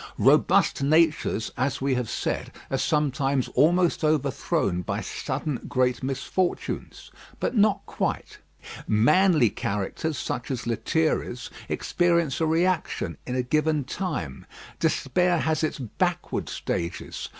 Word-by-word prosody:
Robust -, -, +4 dB
natures, 155 Hz, -6 st, +2 dB
as 130 Hz, +2 st, 0 dB
we 135 Hz, 0 st, +1 dB
have 125 Hz, -3 st, -1 dB
said, -, -, -2 dB, 0.2 s
are -, -, +1 dB
sometimes 140 Hz, -3 st, +1 dB
almost 170 Hz, +5 st, +3 dB
overthrown 140 Hz, -, +1 dB
by -, -, -3 dB
sudden 150 Hz, -5 st, -3 dB
great 125 Hz, -2 st, +1 dB
misfortunes; 135 Hz, +7 st, -3 dB, 0.3 s
but -, -, -1 dB
not 210 Hz, -1 st, +3 dB
quite. -, -, -3 dB, 0.5 s
Manly 150 Hz, -, +4 dB
characters 105 Hz, +10 st, -3 dB
such 125 Hz, -, -4 dB
as 130 Hz, -3 st, -3 dB
Lethierry's 120 Hz, +1 st, -1 dB, 0.2 s
experience 170 Hz, -4 st, +1 dB
a 160 Hz, -, +3 dB
reaction 170 Hz, +2 st, 0 dB
in 125 Hz, -, -2 dB
a 125 Hz, -, +1 dB
given 155 Hz, +2 st, +1 dB
time. 130 Hz, -, -4 dB, 0.3 s
Despair 180 Hz, -1 st, +2 dB
has 160 Hz, -1 st, 0 dB
its 155 Hz, -, -1 dB
backward 125 Hz, -6 st, -2 dB
stages. 85 Hz, +1 st, -4 dB
145 Hz, 115 wpm, -26 LUFS, 125-165 Hz, 0.5 s, Robust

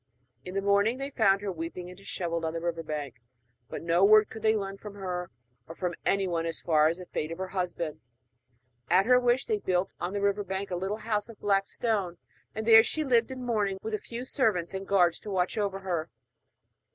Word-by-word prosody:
In 180 Hz, +1 st, -8 dB
the 195 Hz, -, 0 dB
morning 200 Hz, +4 st, +3 dB
they 275 Hz, +1 st, -4 dB
found 200 Hz, -6 st, +3 dB
her, 205 Hz, -1 st, -2 dB
weeping 170 Hz, +1 st, -6 dB
and 180 Hz, -, -10 dB
dishevelled, 175 Hz, -3 st, -4 dB
on 160 Hz, 0 st, -1 dB
the 165 Hz, -, -2 dB
river 165 Hz, 0 st, -2 dB
bank; 145 Hz, -5 st, -5 dB, 0.5 s
but -, -, -6 dB
no 170 Hz, +2 st, +3 dB
word 215 Hz, +1 st, +6 dB
could 220 Hz, -, -8 dB
they 220 Hz, 0 st, +3 dB
learn 195 Hz, -2 st, -3 dB
from 210 Hz, -1 st, -9 dB
her 180 Hz, -3 st, -4 dB, 0.4 s
or 165 Hz, -, -9 dB
from 180 Hz, -1 st, -2 dB
anyone 180 Hz, -4 st, +1 dB
as 165 Hz, -, -2 dB
to -, -, -29 dB, 0.3 s
the 180 Hz, -1 st, -10 dB
fate 155 Hz, -, -2 dB
of 165 Hz, -, -5 dB
her 190 Hz, 0 st, -4 dB
husband. 175 Hz, -4 st, -3 dB, 0.9 s
At 185 Hz, +3 st, +5 dB
her 250 Hz, +1 st, +6 dB
wish 245 Hz, +1 st, +2 dB
they 435 Hz, -2 st, 0 dB
built 185 Hz, -, 0 dB
on 175 Hz, +2 st, -3 dB
the 205 Hz, -, -2 dB
river 200 Hz, +1 st, +1 dB
bank 195 Hz, 0 st, -4 dB
a -, -, 0 dB
little 190 Hz, +4 st, -2 dB
house 215 Hz, 0 st, -2 dB
of 225 Hz, -, -12 dB
black 195 Hz, -1 st, +2 dB
stone; 200 Hz, -7 st, -1 dB, 0.4 s
and 220 Hz, 0 st, -3 dB
there 225 Hz, -1 st, +9 dB
she 310 Hz, +7 st, -1 dB
lived 235 Hz, -5 st, +3 dB
in 260 Hz, -1 st, -6 dB
mourning, 210 Hz, -5 st, 0 dB
with 220 Hz, -, -4 dB
a 215 Hz, -, 0 dB
few 240 Hz, +4 st, -6 dB
servants 210 Hz, -, 0 dB
and 190 Hz, 0 st, -5 dB
guards 180 Hz, -4 st, +3 dB
to 210 Hz, -, -9 dB
watch 185 Hz, -2 st, 0 dB
over 200 Hz, -2 st, -1 dB
her. 175 Hz, -4 st, -2 dB
195 Hz, 220 wpm, -28 LUFS, 180-215 Hz, 0.9 s, there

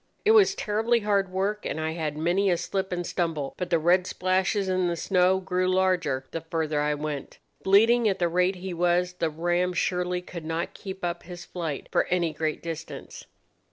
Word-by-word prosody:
It 430 Hz, -, +6 dB
was 400 Hz, -3 st, +6 dB
terribly 225 Hz, -, +1 dB
hard 200 Hz, -2 st, +1 dB
work, 200 Hz, +3 st, -1 dB
and -, -, -3 dB
I 160 Hz, 0 st, -1 dB
had 155 Hz, -2 st, -3 dB
many 175 Hz, +5 st, +2 dB
a 175 Hz, -, +2 dB
slip 190 Hz, +2 st, -3 dB
and 175 Hz, -1 st, -2 dB
stumble; 160 Hz, -7 st, -2 dB
but 180 Hz, -, -4 dB
the 170 Hz, -, +3 dB
red 175 Hz, +3 st, +3 dB
splashes 190 Hz, +2 st, 0 dB
in 185 Hz, -1 st, +1 dB
the 170 Hz, -, 0 dB
snow 185 Hz, +2 st, +2 dB
grew 185 Hz, -1 st, -1 dB
larger 180 Hz, -8 st, +1 dB
the 165 Hz, -, -4 dB
further 160 Hz, -2 st, -1 dB
I 150 Hz, 0 st, +1 dB
went. 150 Hz, -2 st, -5 dB, 0.2 s
Bleeding 225 Hz, +4 st, +5 dB
at 195 Hz, -, 0 dB
the 175 Hz, -, +1 dB
rate 180 Hz, +2 st, +2 dB
he 185 Hz, 0 st, -6 dB
was, 175 Hz, +1 st, +1 dB
the 165 Hz, -2 st, -1 dB
ram 175 Hz, +3 st, 0 dB
surely 180 Hz, +1 st, -1 dB
could 170 Hz, -2 st, -8 dB
not 165 Hz, +2 st, -3 dB
keep 190 Hz, -2 st, -6 dB
up 170 Hz, 0 st, -3 dB
his 175 Hz, 0 st, -9 dB
flight 165 Hz, -5 st, -5 dB
for -, -, +2 dB
any 170 Hz, -3 st, 0 dB
great 155 Hz, 0 st, -2 dB
distance. 165 Hz, -1 st, -7 dB
180 Hz, 195 wpm, -26 LUFS, 165-190 Hz, 0.2 s, It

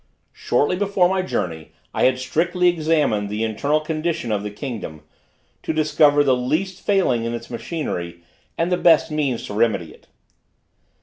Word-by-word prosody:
Shortly 145 Hz, +8 st, 0 dB
before 195 Hz, -2 st, +2 dB
my 190 Hz, +1 st, 0 dB
journey 85 Hz, -, -4 dB, 0.2 s
I -, -, +2 dB
had 130 Hz, 0 st, +3 dB
strictly 175 Hz, +6 st, 0 dB
examined 155 Hz, -11 st, +1 dB
the 105 Hz, +2 st, -2 dB
internal 140 Hz, +8 st, 0 dB
condition 155 Hz, -5 st, -2 dB
of 105 Hz, -1 st, 0 dB
the 105 Hz, -, -4 dB
kingdom, 105 Hz, -, -7 dB, 0.6 s
to -, -, -2 dB
discover 150 Hz, -1 st, +4 dB
the 135 Hz, -2 st, +3 dB
least 160 Hz, +10 st, -2 dB
failing 185 Hz, -, +2 dB
in 115 Hz, 0 st, -2 dB
its 115 Hz, +1 st, -9 dB
machinery, 90 Hz, -, -5 dB, 0.3 s
and 170 Hz, +2 st, 0 dB
the 180 Hz, -, +2 dB
best 165 Hz, -2 st, +4 dB
means 140 Hz, -6 st, -1 dB
to -, -, -7 dB
remedy 105 Hz, -7 st, 0 dB
it. -, -, -22 dB
145 Hz, 160 wpm, -21 LUFS, 115-165 Hz, 0.6 s, discover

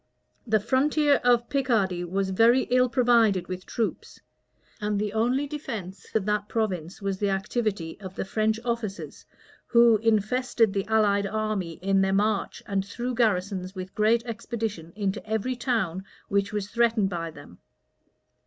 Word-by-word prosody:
The 215 Hz, -1 st, +3 dB
frontier 285 Hz, +6 st, +2 dB
of 240 Hz, -1 st, +3 dB
Picardy 220 Hz, -10 st, +1 dB
was 190 Hz, +2 st, -1 dB
very 230 Hz, +6 st, +4 dB
ill 250 Hz, 0 st, +4 dB
provided 230 Hz, -8 st, +3 dB
with 185 Hz, 0 st, -6 dB
troops; 220 Hz, -7 st, -3 dB, 0.6 s
and 210 Hz, 0 st, -1 dB
the 210 Hz, 0 st, -2 dB
only 245 Hz, +6 st, +1 dB
defence 215 Hz, -, -6 dB
of 215 Hz, -3 st, +1 dB
that 210 Hz, 0 st, -1 dB
province 190 Hz, -4 st, -2 dB
was 195 Hz, -1 st, -2 dB
the 205 Hz, -, +1 dB
activity 195 Hz, -3 st, -2 dB
of 190 Hz, -2 st, -9 dB
the -, -, -3 dB
French 220 Hz, +2 st, 0 dB
officers, 230 Hz, -4 st, -4 dB, 0.4 s
who 235 Hz, -2 st, +6 dB
infested 225 Hz, +1 st, +1 dB
the 195 Hz, -1 st, -1 dB
allied 205 Hz, -2 st, +2 dB
army 215 Hz, -5 st, -2 dB
in 195 Hz, 0 st, +3 dB
their 195 Hz, 0 st, +1 dB
march, 205 Hz, +1 st, 0 dB
and 195 Hz, -3 st, -1 dB
threw 240 Hz, +5 st, -4 dB
garrisons, 195 Hz, -4 st, 0 dB
with 185 Hz, 0 st, -7 dB
great 225 Hz, +2 st, +2 dB
expedition, 225 Hz, -7 st, -4 dB
into 200 Hz, -1 st, -2 dB
every 220 Hz, +4 st, -2 dB
town 215 Hz, -8 st, -1 dB, 0.3 s
which 200 Hz, 0 st, +1 dB
was 205 Hz, -1 st, -3 dB
threatened 230 Hz, -4 st, +2 dB
by 165 Hz, -1 st, -3 dB
them. 145 Hz, -, -14 dB
210 Hz, 150 wpm, -26 LUFS, 195-235 Hz, 0.6 s, who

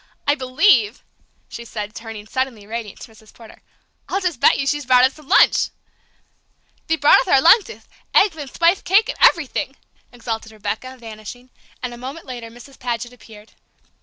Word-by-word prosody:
I 285 Hz, -, +3 dB
believe," 255 Hz, -, +2 dB, 0.4 s
she 235 Hz, -, -9 dB
said, 215 Hz, -2 st, -7 dB
turning, 225 Hz, -2 st, -9 dB
suddenly 250 Hz, -3 st, -3 dB
radiant, 220 Hz, -1 st, -7 dB
to 230 Hz, -, -11 dB
Mrs. 220 Hz, 0 st, -19 dB
Porter, 225 Hz, -2 st, -16 dB, 0.5 s
"I'll 390 Hz, -, 0 dB
just 360 Hz, -9 st, -2 dB
bet -, -, +4 dB
you 275 Hz, -, -2 dB
she's 290 Hz, -1 st, -2 dB
brought 250 Hz, -1 st, +5 dB
us 265 Hz, -, 0 dB
some 305 Hz, -3 st, -17 dB
lunch!" -, -, +4 dB, 1.2 s
"Thee 325 Hz, -, +2 dB
brought 295 Hz, -2 st, +5 dB
uth -, -, -6 dB
our 270 Hz, -, +5 dB
luncheth 415 Hz, -, +3 dB, 0.3 s
eggth 395 Hz, -5 st, +4 dB
and 290 Hz, -4 st, -7 dB
thpith 340 Hz, +3 st, +2 dB
caketh 395 Hz, +4 st, +2 dB
and -, -, +9 dB
everything!" 290 Hz, -4 st, -5 dB, 0.4 s
exulted 225 Hz, -2 st, -6 dB
Rebecca, 215 Hz, +5 st, -5 dB
vanishing, 230 Hz, +2 st, -11 dB, 0.3 s
and 250 Hz, -1 st, -4 dB
a 240 Hz, -, -11 dB
moment 270 Hz, +6 st, -8 dB
later 240 Hz, -3 st, -8 dB
Mrs. 245 Hz, +4 st, -15 dB
Paget 240 Hz, 0 st, -4 dB
appeared. 215 Hz, -2 st, -16 dB
250 Hz, 170 wpm, -20 LUFS, 225-290 Hz, 1.2 s, and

